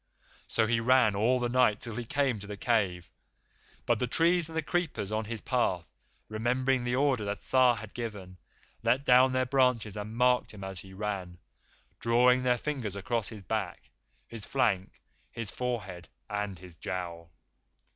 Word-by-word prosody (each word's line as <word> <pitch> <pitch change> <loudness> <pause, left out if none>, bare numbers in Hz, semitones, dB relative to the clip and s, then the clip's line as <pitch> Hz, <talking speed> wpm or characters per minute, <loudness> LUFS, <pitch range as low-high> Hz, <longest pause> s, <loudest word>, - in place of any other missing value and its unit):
So 110 - +2
he 115 +1 +1
ran 120 -3 +4
all 115 +6 +3
the 125 -1 0
night 120 -4 +3
till 115 -3 -5
he 120 0 -4
came 130 -2 0
to 100 - -9
the 105 -1 -6
cave; 95 -7 0 0.8
but 120 -2 +2
the 125 - 0
trees 165 +4 +3
and 160 - -6
the 160 - 0
creepers 160 - -2
on 110 0 -1
his 115 0 -4
path, 95 -9 0 0.4
remembering 125 +4 0
the 120 0 0
order 135 -4 +2
that 100 0 -2
Tha 130 -2 +4
had 110 -1 -9
given, 100 -6 -6 0.4
let 125 +4 +1
down 130 +1 +6
their 130 0 +1
branches 125 -6 +2
and 105 +2 -6
marked 125 -2 +2
him 100 - -9
as 95 -1 -6
he 95 +1 -12
ran, 95 -3 -4 0.6
drawing 125 +2 +4
their 125 -1 +2
fingers 120 -7 -4
across 110 +2 -1
his 105 -4 -9
back, 85 - -4 0.4
his 115 -3 -8
flank, 105 -8 0 0.3
his 115 -3 -4
forehead, 105 -8 -4 0.2
and 105 -2 -3
his 90 0 -13
jowl. 85 -1 -5
115 Hz, 170 wpm, -29 LUFS, 100-125 Hz, 0.8 s, down